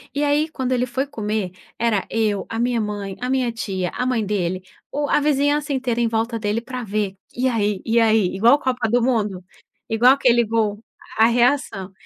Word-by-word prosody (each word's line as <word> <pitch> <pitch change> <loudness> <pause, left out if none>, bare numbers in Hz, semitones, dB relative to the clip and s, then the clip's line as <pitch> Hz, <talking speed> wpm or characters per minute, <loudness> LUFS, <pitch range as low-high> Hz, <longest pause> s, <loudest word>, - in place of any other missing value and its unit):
e 290 - 0
aí 295 +2 +2
quando 260 -4 -4
ele 250 0 +1
foi 260 +3 -2
comer, 215 -7 -3 0.3
era 225 -4 +1
eu, 210 -3 0
a 225 - -4
minha 240 0 +1
mãe, 205 -2 -4
a 250 +1 -3
minha 255 -3 +1
tia, 190 -5 -3
a 250 - -2
mãe 240 -5 0
dele, 185 -2 -2 0.3
o 290 0 -1
a - - +4
vizinhança 290 0 +1
inteira 250 -3 -1
em 235 - +2
volta 225 +1 -1
dele 210 +2 -1
pra 250 +1 -6
ver, 205 -1 -2 0.2
e 255 +2 +1
aí, 210 -4 0
e 230 +1 +3
aí 220 -4 +3
igual 235 +8 +5
Copa 255 -4 -1
do 240 +1 +2
Mundo, 210 -7 0 0.5
igual 240 +4 +5
aquele 245 -4 +3
gol, 215 -2 0 0.4
a 220 - +6
reação. 235 -5 +1
230 Hz, 195 wpm, -21 LUFS, 210-255 Hz, 0.5 s, a